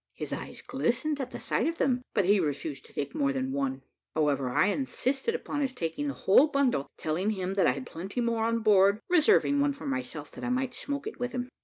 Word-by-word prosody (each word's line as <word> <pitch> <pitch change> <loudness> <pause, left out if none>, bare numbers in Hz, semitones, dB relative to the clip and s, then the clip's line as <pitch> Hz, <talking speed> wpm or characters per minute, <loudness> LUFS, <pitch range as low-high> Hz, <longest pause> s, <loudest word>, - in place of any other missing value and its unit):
His - - -5
eyes - - -6
glistened 280 +3 -1
at 255 - -4
the - - -7
sight - - 0
of 330 0 -2
them, 250 -2 +1
but 200 - +3
he 200 +2 +4
refused 145 -2 -3
to - - -20
take 140 - -3
more 140 -1 +1
than 130 -1 -2
one 135 -1 -2 0.3
however, 145 -4 +1
I 125 - +3
insisted 270 - -1
upon 290 -10 -3
his 270 -2 -1
taking 175 - -3
the 280 - -3
whole 255 +10 +5
bundle, 275 - +1
telling 170 +6 -1
him 190 -3 -2
that 195 - +3
I 125 - +4
had 135 0 -6
plenty 190 +8 -6
more 230 -2 +1
on 230 0 +1
board, 200 -1 +5
reserving 320 -4 +4
one 285 0 +2
for 280 - -10
myself, 255 - -4
that - - -10
I 250 - -1
might 255 0 0
smoke 280 +2 -4
it - - -6
with 245 0 -3
him. 250 0 -3
230 Hz, 230 wpm, -29 LUFS, -, 0.3 s, whole